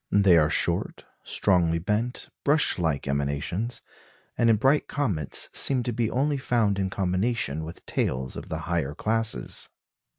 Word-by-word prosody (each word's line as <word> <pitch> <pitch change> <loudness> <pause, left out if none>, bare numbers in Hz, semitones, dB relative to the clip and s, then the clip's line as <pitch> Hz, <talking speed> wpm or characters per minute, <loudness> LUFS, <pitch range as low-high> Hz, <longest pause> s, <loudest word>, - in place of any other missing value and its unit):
They 100 -3 +5
are 75 -2 +4
short, - - -1 0.2
strongly 85 -4 +2
bent, 105 +8 -2
brush 145 -7 +3
like 80 -5 -1
emanations, 70 - -2 0.5
and 115 - +3
in 115 - +6
bright 135 +7 +2
comets 100 - -1
seem 130 -3 +3
to 120 - -2
be 115 -1 0
only 140 +4 0
found 115 -6 +1
in 95 -1 0
combination 95 - -1
with 80 +2 -9
tails 65 +1 -2
of - - -8
the 80 +1 -4
higher 80 -3 -2
classes. 110 - -1
100 Hz, 145 wpm, -26 LUFS, 80-120 Hz, 0.5 s, in